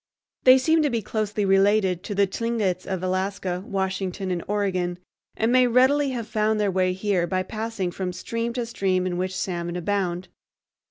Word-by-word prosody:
They 255 0 +9
seem 320 +5 +3
to 295 - +2
be 230 -4 -2
closely 210 -1 -1
related 195 -1 +3
to 205 - -4
the 200 0 +4
Tlingits 195 -3 -2
of 190 -2 -3
Alaska, 185 -1 -2
Washington, 190 -1 -2
and 175 -2 -2
Oregon, 185 -4 -1 0.4
and 225 +2 +1
may 255 0 +5
readily 265 +4 +4
have 240 -4 -4
found 215 -1 +1
their 205 -2 +1
way 185 0 +1
here 185 -2 0
by 185 0 0
passing 215 -2 -3
from 185 0 -3
stream 230 +6 -3
to 245 -1 -2
stream 190 -5 0
in 180 -1 -2
which 185 0 -2
salmon 175 -2 -3
abound. 180 -1 -1
195 Hz, 175 wpm, -24 LUFS, 185-225 Hz, 0.4 s, They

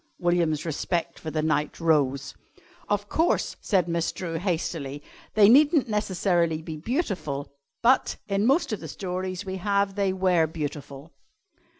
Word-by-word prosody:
William's 170 -4 +1
respect 170 +2 -2
for 160 - -5
the 155 0 -1
knight 150 -1 0
rose. 140 -5 +1 0.6
"Of 205 0 0
course," 325 +10 +1
said 185 -5 +1
Miss 170 -1 0
Drew 165 -3 -4
hastily, 160 -6 -3 0.3
"they 210 -2 +7
needn't 285 +4 +5
necessarily 180 -6 0
be 160 -1 -6
beautiful, 165 - -3 0.3
but, 255 +3 +3
in 200 +2 +1
most 275 -2 +2
of 210 - -3
the - - -7
stories 185 0 -4
we 190 0 -4
have, 200 +1 +1
they 200 -1 +1
were 185 -3 +2
beautiful." 145 -1 -6
175 Hz, 140 wpm, -26 LUFS, 155-200 Hz, 0.6 s, they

